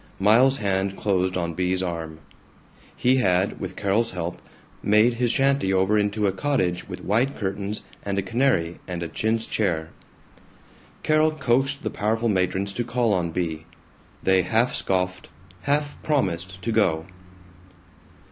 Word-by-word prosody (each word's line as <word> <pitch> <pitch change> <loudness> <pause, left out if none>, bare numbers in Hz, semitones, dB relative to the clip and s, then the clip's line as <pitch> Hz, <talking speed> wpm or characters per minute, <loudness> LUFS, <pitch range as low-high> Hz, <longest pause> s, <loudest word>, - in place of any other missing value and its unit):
Miles's 120 +7 +5
hand 95 -3 -1
closed 95 -2 0
on 85 -2 -2
Bea's 90 +2 0
arm. 80 -3 -5 0.7
He 130 +1 +3
had, 95 -5 +1
with 95 -1 -5
Carol's 105 +3 0
help, 90 -1 -4 0.4
made 105 +3 +4
his 120 +1 0
shanty 135 -5 +2
over 95 +2 +2
into 105 0 +1
a 100 - +3
cottage 95 -7 -1
with - - -7
white 120 +8 +1
curtains 100 +1 -3 0.2
and 100 -1 -2
a 100 - +1
canary 95 -6 +1
and 90 -2 -4
a - - -3
chintz 110 +7 -1
chair. 80 -6 -1 1.1
Carol 155 0 +4
coaxed 140 -1 0
the 110 - -2
powerful 115 +3 0
matrons 95 0 0
to 120 - -1
call 120 -2 +1
on 90 -3 0
Bea. 80 -2 -3 0.6
They 95 0 +4
half 115 +7 +1
scoffed, 90 -1 -1 0.3
half 145 +1 -1
promised 95 - -1
to 115 - -1
go. 85 -8 +2
100 Hz, 145 wpm, -24 LUFS, 90-120 Hz, 1.1 s, Miles's